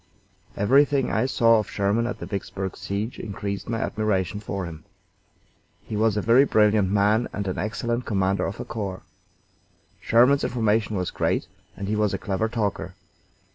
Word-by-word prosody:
Everything 135 +5 +3
I 110 +4 +1
saw 115 -3 +4
of 105 - -4
Sherman 105 +4 0
at 125 - -4
the - - -7
Vicksburg 95 -2 -4
siege 100 +4 -4
increased 100 -1 -5
my 115 - -1
admiration 105 -3 -1
for 100 -2 -4
him. 80 -2 -9 1.0
He 110 - -6
was 110 0 +2
a 105 - 0
very 120 +4 +6
brilliant 105 -6 +3
man 105 +4 +2
and 100 -1 -4
an 95 - -2
excellent 115 +4 -2
commander 95 -2 +1
of 100 - -6
a - - -5
corps. 100 -4 -5 1.0
Sherman's 125 +5 +4
information 110 -2 +1
was 90 -2 -2
great, - - 0 0.3
and 100 +1 -5
he 105 - 0
was 105 -2 +1
a - - -2
clever 100 +4 -2
talker. 100 -6 -2
105 Hz, 165 wpm, -24 LUFS, 100-115 Hz, 1.0 s, very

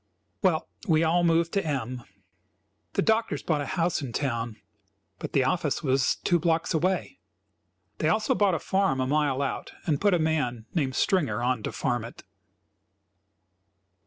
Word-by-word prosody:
Well, 175 -5 +2 0.2
we 160 -1 +4
all 170 +2 +3
moved 165 0 +3
to 195 - +1
M. 130 -5 -3 0.9
The - - +1
doctors 220 +1 +1
bought 155 -3 0
a 145 - -4
house 175 -3 0
in 130 -4 -6
town, 115 -5 -2 0.6
but - - -6
the 135 - +4
office 150 +3 0
was 135 -1 +2
two 175 - +3
blocks 165 +1 +1
away. 185 - -1 0.8
They - - +2
also 215 0 +2
bought 200 -4 +2
a - - -2
farm 190 -8 +1
a 130 - +1
mile 140 -1 +1
out, 135 - -4
and 150 -5 0
put 205 -2 +4
a - - +3
man, 150 -8 -1
named 135 -6 0
Stringer, 140 - +1
on 125 -2 +1
to - - -4
farm 120 -2 -1
it. 115 - -10
155 Hz, 160 wpm, -27 LUFS, 130-175 Hz, 0.9 s, we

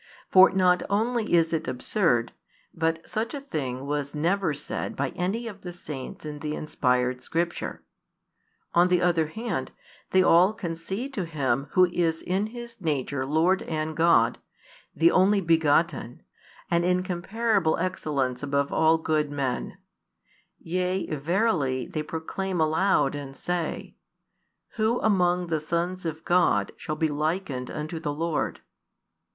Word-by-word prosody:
For 190 0 +8
not 185 -1 +3
only 220 +2 0
is 165 -1 +4
it 160 0 -1
absurd, 125 - 0 0.4
but 165 0 -1
such 225 +6 -2
a - - -3
thing 135 - -4
was 145 0 -3
never 175 +3 +1
said 145 0 -4
by 140 0 -1
any 190 +7 -2
of 205 -4 -8
the 180 - -6
saints 150 -6 -8
in 150 -1 -6
the 150 0 -3
inspired 125 -3 0
Scripture. 170 +1 -3 0.9
On 175 +1 +5
the 180 -1 +3
other 170 -3 +2
hand, 220 +9 -4 0.4
they 185 0 +4
all 180 +4 +5
concede 195 +7 -5
to 195 -8 -2
Him 140 -4 -1
Who 185 - +6
is 170 -2 -1
in 190 +4 0
His 235 -1 -9
nature 140 -4 -1
Lord 165 +6 +2
and 155 -1 -3
God, 165 +1 +4 0.6
the 340 - +5
Only 200 +2 +4
begotten, 160 -6 +1 0.5
an 170 0 +3
incomparable 180 +1 +1
excellence 145 -8 -1
above 140 0 0
all 160 0 +4
good 155 -2 0
men; 135 -3 -3 0.8
yea, 180 0 -2
verily, 150 - 0
they 155 - -4
proclaim 175 +4 -4
aloud 155 -2 +2
and 140 -2 -7
say: 175 -2 -3 0.8
Who 220 +2 +2
among 180 -4 +2
the 165 -2 -1
sons 170 +4 -2
of 160 0 -4
God 175 0 +3
shall 155 - -4
be 160 - +1
likened 150 -3 -2
unto 155 +2 -5
the 150 -2 -2
Lord? 160 +1 -2
165 Hz, 140 wpm, -26 LUFS, 150-185 Hz, 0.9 s, For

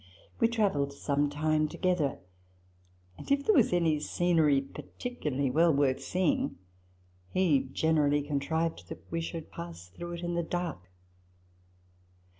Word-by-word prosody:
We 230 - +5
travelled 195 -12 0
some 145 +1 0
time 155 +1 +1
together; 165 -4 0 1.0
and, - - -7
if 280 0 +2
there 435 - +5
was 255 - +4
any 165 -4 +2
scenery 160 -3 +2
particularly 140 - -4
well 165 +5 +4
worth 140 -2 +2
seeing, 220 - 0 0.7
he 155 -8 +2
generally 145 -1 +2
contrived 160 +3 -2
that - - -9
we 165 0 -1
should 165 -1 -6
pass 85 +1 -8
through 175 - -7
it 170 - -6
in 175 0 -2
the 170 - +1
dark. 165 - -4
160 Hz, 130 wpm, -30 LUFS, 140-175 Hz, 1.0 s, We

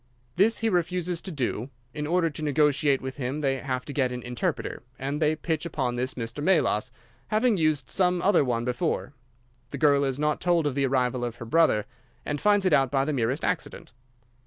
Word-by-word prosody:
This 220 +5 +3
he 225 - 0
refuses 175 -1 -1
to 190 - -6
do. 130 -4 -2 0.2
In 150 0 -4
order 170 0 +1
to 150 - -7
negotiate 145 -1 +2
with 130 0 -5
him 135 +3 -3
they 135 -2 0
have 130 -2 -3
to 145 - -6
get 130 -3 +1
an 125 -1 -5
interpreter, 120 -3 -3 0.2
and 140 +3 -3
they 155 0 +3
pitch 155 0 -2
upon 135 -7 -2
this 130 +2 -2
Mr. 120 +4 -5
Melas, 150 - +2 0.4
having 220 +2 +2
used 155 -4 +1
some 180 -2 +1
other 190 -6 +4
one 120 -3 -1
before. 125 +2 -2 0.6
The - - -6
girl 145 -2 +4
is 135 -1 -1
not 150 +1 0
told 170 -2 +2
of 145 - 0
the 140 0 +1
arrival 125 -1 0
of 120 -1 -3
her 120 - -8
brother, 115 -5 +3 0.4
and 145 -1 -3
finds 205 -2 +3
it 185 - +3
out 135 -3 +4
by 135 0 +1
the 155 - -1
merest 130 +2 0
accident." 180 - -3
145 Hz, 205 wpm, -26 LUFS, 130-165 Hz, 0.6 s, other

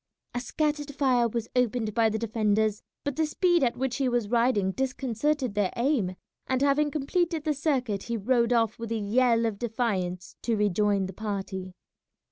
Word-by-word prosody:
A 245 - -1
scattered 295 +2 -2
fire 255 -4 +3
was 230 0 -3
opened 240 -3 +1
by 225 0 +3
the 220 - -1
defenders, 215 -1 +1 0.2
but 285 -2 -2
the 315 +1 +1
speed 350 0 +2
at 240 -2 +1
which 260 -1 -1
he 270 -3 +1
was 240 -4 0
riding 230 -5 +2
disconcerted 265 +1 -1
their 205 -2 +1
aim, 235 -8 +1 0.3
and 260 +1 +1
having 290 +1 +3
completed 320 +2 -1
the 305 -1 +1
circuit 260 -8 0
he 235 -1 -3
rode 235 +2 +2
off 230 -3 +2
with 230 -1 -5
a 230 - 0
yell 230 +2 +2
of 215 -3 -2
defiance 200 -7 -2
to 230 -2 0
rejoin 205 -1 +2
the 190 - -6
party. 195 -3 -5
235 Hz, 175 wpm, -27 LUFS, 210-265 Hz, 0.3 s, fire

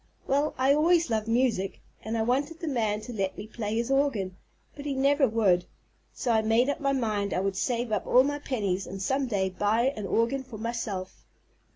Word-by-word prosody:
Well, 285 +3 +1
I 265 +2 +4
always 330 -1 +3
loved 220 -1 0
music, 230 -5 +1 0.2
and 225 +1 -2
I 220 - +1
wanted 280 +7 0
the 330 - -5
man 220 -6 0
to 245 +3 -8
let 195 -3 -2
me 205 - -6
play 215 -1 -4
his 235 +3 -1
organ, 230 -10 +1 0.4
but 285 - -8
he 280 -2 -2
never 275 +1 +3
would. 200 -6 +2 0.5
So 245 - -2
I 220 -1 +4
made 225 +4 +3
up 285 - -1
my 275 -2 +1
mind 215 -6 -1
I - - +1
would 195 0 -1
save 235 +3 -1
up 210 - -1
all 255 - +6
my 290 +1 -2
pennies 200 -9 -2
and 195 - -6
some 265 +7 0
day 190 -4 0
buy 220 +8 +1
an 210 -2 -4
organ 235 +7 +1
for 255 -4 -10
myself. 215 -4 -4
230 Hz, 210 wpm, -28 LUFS, 205-270 Hz, 0.5 s, all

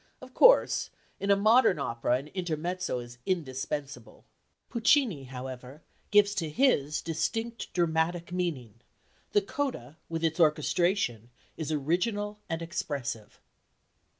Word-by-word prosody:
Of - - -13
course, - - +5 0.3
in 200 - -3
a 200 - +6
modern 215 -1 +4
opera 120 -4 -1
an 140 +3 -9
intermezzo 175 -2 -2
is 120 0 -9
indispensable. 145 -3 -4 0.4
Puccini, 235 - +2
however, 130 +2 -8 0.3
gives 205 -1 +5
to 165 -3 -1
his 150 - +2
distinct 225 +9 -3
dramatic 170 0 0
meaning: 135 - -3 0.5
the 415 -1 +4
coda 265 - -4
with 165 0 -3
its 160 +1 0
orchestration 155 - +1 0.3
is 160 -1 -4
original 205 +8 -1
and 165 0 -2
expressive." 145 - -4
165 Hz, 115 wpm, -29 LUFS, 140-200 Hz, 0.5 s, a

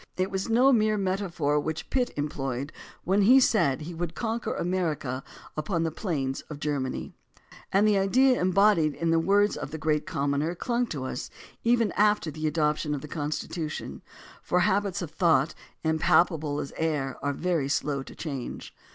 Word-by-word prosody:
It 185 +1 0
was 190 +2 -2
no 255 +4 +5
mere 215 -2 +3
metaphor 185 -7 0
which 160 +2 -4
Pitt 250 -2 +1
employed 140 -1 -3 0.3
when 195 +3 +2
he 250 +7 +7
said 155 - +2
he 165 +3 -6
would 170 0 -4
"conquer 230 0 -2
America 160 -8 -2 0.3
upon 165 +2 -1
the 165 - -1
plains 145 -8 -2
of 150 -2 -7
Ger 145 -1 -1
many," 130 -1 -4 0.6
and 200 +2 +4
the 205 -2 +4
idea 250 +6 +3
embodied 185 -5 +3
in 165 0 0
the 165 - +4
words 200 +5 +3
of - - -5
the 160 - -5
Great 155 -1 0
Commoner 150 0 -1
clung 240 +5 -1
to 140 -9 -5
us 130 -1 -4 0.3
even 230 -2 +3
after 210 -6 +2
the 155 +1 -3
adoption 150 -1 0
of 140 - -5
the 150 - -8
Constitution, 155 +1 -4 0.4
for 180 - +1
habits 195 -1 +1
of 160 - -7
thought, 160 -4 +2 0.3
impalpa 160 +1 +3
ble 145 -1 -3
as 140 - -5
air, 150 -5 -1
are 145 - 0
very 160 -2 -1
slow 140 0 0
to - - -11
change. 140 -6 -6
165 Hz, 175 wpm, -27 LUFS, 150-195 Hz, 0.6 s, he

